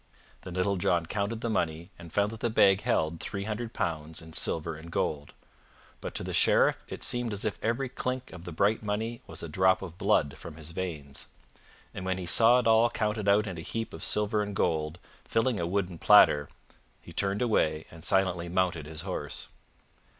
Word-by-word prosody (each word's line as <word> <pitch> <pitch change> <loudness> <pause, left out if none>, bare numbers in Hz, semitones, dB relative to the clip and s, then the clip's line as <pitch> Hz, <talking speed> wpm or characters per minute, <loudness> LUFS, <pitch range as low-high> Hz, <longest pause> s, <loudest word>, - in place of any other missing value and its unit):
Then 90 -1 -8
Little 95 +2 +1
John 85 -1 +1
counted 105 +5 -2
the 120 - -2
money 85 -2 -2
and 85 -2 -11
found 100 +3 +1
that 115 - -8
the 120 - 0
bag 100 -3 +5
held 80 +1 0
three 100 -1 -4
hundred 110 +2 -4
pounds 80 -4 -3
in 80 -1 -11
silver 80 +1 -1
and 80 +2 -11
gold. 75 -3 -2 0.7
But - - -7
to - - -1
the - - -4
Sheriff - - +4
it - - -7
seemed 120 -2 -1
as 100 - -4
if 105 - -2
every 115 +5 0
clink 125 0 -4
of 90 -2 -10
the 90 - -7
bright 100 +6 +2
money 110 +3 -3
was 80 0 -7
a - - -4
drop 95 +4 +3
of 90 -1 -9
blood 100 -9 +2
from - - -9
his 80 0 -7
veins. 80 -6 -5 0.7
And - - -6
when 95 0 -1
he 90 - -5
saw 115 +7 +6
it 125 - +1
all 115 +1 +5
counted 105 -2 -1
out 105 +2 +4
in 90 -5 -5
a - - -5
heap 115 +6 -4
of - - -7
silver 105 0 +2
and 105 -1 -4
gold, 80 -1 0 0.3
filling 115 -1 +1
a 85 - -1
wooden 90 -2 -2
platter, 75 -1 +6 0.5
he - - -13
turned 100 +3 0
away 80 -9 +1
and 80 -1 -12
silently 90 -2 +1
mounted 85 -4 0
his 75 0 -6
horse. - - -5
95 Hz, 200 wpm, -29 LUFS, 80-110 Hz, 0.7 s, saw